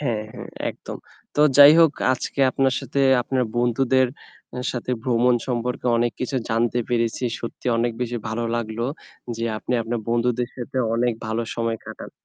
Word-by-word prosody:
হ্যাঁ, 120 Hz, -7 st, -1 dB
হ্যাঁ -, -, -9 dB, 0.2 s
একদম। -, -, -9 dB, 0.4 s
তো -, -, +1 dB, 0.2 s
যাই 145 Hz, +1 st, +10 dB
হোক 165 Hz, -3 st, +6 dB, 0.2 s
আজকে 130 Hz, -, -3 dB
আপনার 135 Hz, 0 st, +1 dB
সাথে 140 Hz, -, -2 dB, 0.2 s
আপনার 130 Hz, +1 st, 0 dB
বন্ধুদের 130 Hz, +2 st, +2 dB, 0.5 s
অ্যা 125 Hz, -, -5 dB
সাথে 125 Hz, 0 st, -4 dB
ভ্রমণ 125 Hz, 0 st, +3 dB
সম্পর্কে 125 Hz, 0 st, -2 dB
অনেক 120 Hz, 0 st, +1 dB
কিছু 130 Hz, +2 st, -2 dB
জানতে 115 Hz, +2 st, +1 dB
পেরেছি। 115 Hz, 0 st, 0 dB, 0.2 s
সত্যি 115 Hz, -, -7 dB
অনেক 120 Hz, 0 st, +1 dB
বেশি 120 Hz, -1 st, -2 dB
ভালো 115 Hz, +2 st, -2 dB
লাগলো 115 Hz, 0 st, -3 dB, 0.5 s
যে 115 Hz, -, -3 dB
আপনি 125 Hz, -, -4 dB
আপনার 115 Hz, +1 st, -3 dB
বন্ধুদের 120 Hz, +1 st, +1 dB
সাথে 125 Hz, +1 st, -7 dB, 0.2 s
অনেক 120 Hz, +1 st, +1 dB
ভালো 110 Hz, +1 st, -1 dB
সময় 115 Hz, -1 st, -1 dB
কাটান। -, -, -9 dB
120 Hz, 160 wpm, -23 LUFS, 115-125 Hz, 0.5 s, যাই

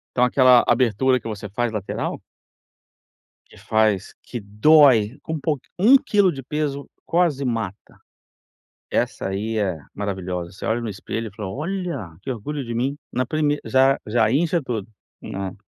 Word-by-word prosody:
Então 125 Hz, -, +4 dB
aquela 125 Hz, -1 st, +6 dB
abertura 125 Hz, +1 st, +3 dB
que 115 Hz, -, -9 dB
você 105 Hz, -2 st, -6 dB
faz 120 Hz, +2 st, -1 dB
lateral 105 Hz, -3 st, -3 dB, 1.3 s
que -, -, -17 dB
faz 110 Hz, -3 st, +1 dB
que 120 Hz, -, -6 dB
dói, 125 Hz, +1 st, +5 dB
com 160 Hz, -, -5 dB
um 155 Hz, -, -2 dB
pouqu 150 Hz, -3 st, -1 dB, 0.2 s
1 250 Hz, +8 st, +7 dB
quilo 205 Hz, -9 st, +2 dB
de 135 Hz, -2 st, -8 dB
peso 140 Hz, 0 st, -3 dB, 0.2 s
quase 165 Hz, -6 st, +1 dB
mata. 115 Hz, -5 st, -4 dB, 0.9 s
Essa -, -, -1 dB
aí 110 Hz, +3 st, -2 dB
é 95 Hz, -6 st, 0 dB, 0.2 s
maravilhosa, 95 Hz, -3 st, -4 dB
você 95 Hz, -, -8 dB
olha 115 Hz, +2 st, +1 dB
no 115 Hz, -2 st, -4 dB
espelho, 110 Hz, +3 st, -5 dB
e 100 Hz, -, -22 dB
fala: 100 Hz, -3 st, -5 dB
"Olha, 155 Hz, -, -4 dB
que 130 Hz, -, -4 dB
orgulho 140 Hz, +5 st, -4 dB
de 120 Hz, -1 st, -5 dB
mim". 130 Hz, +5 st, -1 dB, 0.2 s
Na 130 Hz, 0 st, 0 dB
prime 150 Hz, +1 st, 0 dB
já 135 Hz, +1 st, +4 dB
já 110 Hz, 0 st, +2 dB
incha 165 Hz, +3 st, +2 dB
tudo, 110 Hz, -6 st, -4 dB, 0.3 s
né. 95 Hz, 0 st, -5 dB
120 Hz, 160 wpm, -22 LUFS, 105-145 Hz, 1.3 s, 1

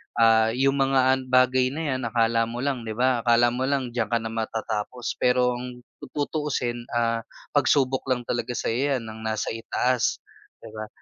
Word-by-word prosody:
ah, 115 Hz, 0 st, +4 dB
yung 135 Hz, +2 st, +2 dB
mga 135 Hz, -1 st, +3 dB
bagay 130 Hz, 0 st, +4 dB
na 160 Hz, -, -3 dB
'yan 130 Hz, 0 st, -2 dB
akala 115 Hz, 0 st, +2 dB
mo 120 Hz, +2 st, -5 dB
lang 130 Hz, -5 st, -2 dB
'di 110 Hz, -, -4 dB
ba 125 Hz, +1 st, +2 dB
akala 120 Hz, 0 st, +4 dB
mo 130 Hz, +2 st, -1 dB
lang 135 Hz, -3 st, -1 dB
diyan 120 Hz, -1 st, -1 dB
ka 115 Hz, -, +3 dB
na 115 Hz, -, -4 dB
matatapos 110 Hz, +1 st, -3 dB
pero 125 Hz, 0 st, +3 dB
ang 125 Hz, 0 st, -8 dB, 0.3 s
tutuusin, 140 Hz, -5 st, -2 dB
ah, 115 Hz, -1 st, +1 dB, 0.3 s
pagsubok 135 Hz, -2 st, +2 dB
lang 125 Hz, -2 st, 0 dB
talaga 120 Hz, +1 st, -3 dB
sa'yo 135 Hz, +6 st, 0 dB
'yan 120 Hz, -, -4 dB
ng 110 Hz, 0 st, -9 dB
nasa 110 Hz, -1 st, -2 dB
itaas 120 Hz, +2 st, 0 dB, 0.5 s
'di -, -, -10 dB
ba, 110 Hz, 0 st, -6 dB
125 Hz, 175 wpm, -25 LUFS, 115-130 Hz, 0.5 s, ah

